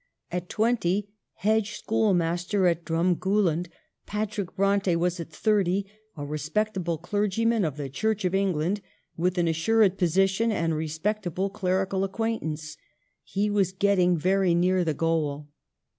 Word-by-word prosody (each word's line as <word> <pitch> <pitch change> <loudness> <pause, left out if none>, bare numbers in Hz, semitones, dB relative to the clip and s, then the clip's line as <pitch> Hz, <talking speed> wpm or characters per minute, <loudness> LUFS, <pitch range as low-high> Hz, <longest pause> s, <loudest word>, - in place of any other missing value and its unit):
At 180 0 -4
twenty, 210 -3 0 0.2
hedge 215 0 0
schoolmaster 185 -3 +1
at 170 -1 +2
Drumgooland, 175 +1 +1 0.4
Patrick 210 -2 -3
Bronte 195 -2 +2
was 175 +1 0
at 165 - -6
thirty 195 +2 +1 0.3
a 145 - -4
respectable 170 +4 -2
clergyman 210 +5 0
of 155 -4 -2
the 145 -2 -4
Church 215 +9 -1
of 180 - 0
England, 195 0 0 0.3
with 180 +2 0
an 175 -1 +2
assured 195 +4 +2
posi 185 +2 +3
tion 225 +4 0
and 165 -5 0
respectable 180 +4 -2
clerical 190 -1 0
acquaintance. 165 -8 -3 0.5
He 200 +2 -1
was 195 -3 +1
getting 185 -3 +3
very 185 +1 +2
near 180 +1 +2
the 160 -3 -1
goal. 150 -3 -1
185 Hz, 130 wpm, -26 LUFS, 165-205 Hz, 0.5 s, posi